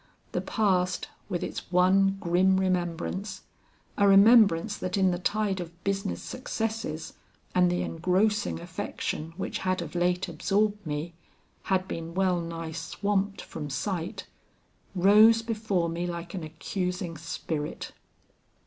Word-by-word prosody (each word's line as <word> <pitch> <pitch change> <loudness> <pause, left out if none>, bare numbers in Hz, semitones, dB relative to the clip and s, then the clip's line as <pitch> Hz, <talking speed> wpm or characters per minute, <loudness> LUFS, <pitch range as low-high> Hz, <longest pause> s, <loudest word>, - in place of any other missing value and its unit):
The - - -1
past, 185 -5 0 0.2
with 175 - -2
its - - -6
one 195 +2 +4
grim 185 +2 +3
remembrance 185 +2 -2 0.6
a 200 - +5
remembrance 200 -2 +6
that 185 +1 -2
in 190 -1 +4
the 175 - -2
tide 205 +1 0
of 170 0 -8
business 195 0 -2
successes 225 -9 -4 0.4
and 180 -1 +4
the 175 - 0
engrossing 185 - +1
affection 160 - -4
which 190 - -3
had 185 0 0
of 165 -3 -5
late 180 +1 +1
absorbed 210 +1 0
me, 150 +3 -3 0.5
had 190 -1 +1
been 165 -1 -6
well 185 -2 +2
nigh 165 -1 -5
swamped 195 +5 -1
from 150 -2 -6
sight 170 +5 -3 0.7
rose 215 +5 +6
before 215 -6 0
me 170 +1 -2
like 170 0 -5
an 185 -4 -4
accusing 180 +2 -3
spirit. 155 -1 -4
185 Hz, 130 wpm, -28 LUFS, 170-200 Hz, 0.7 s, remembrance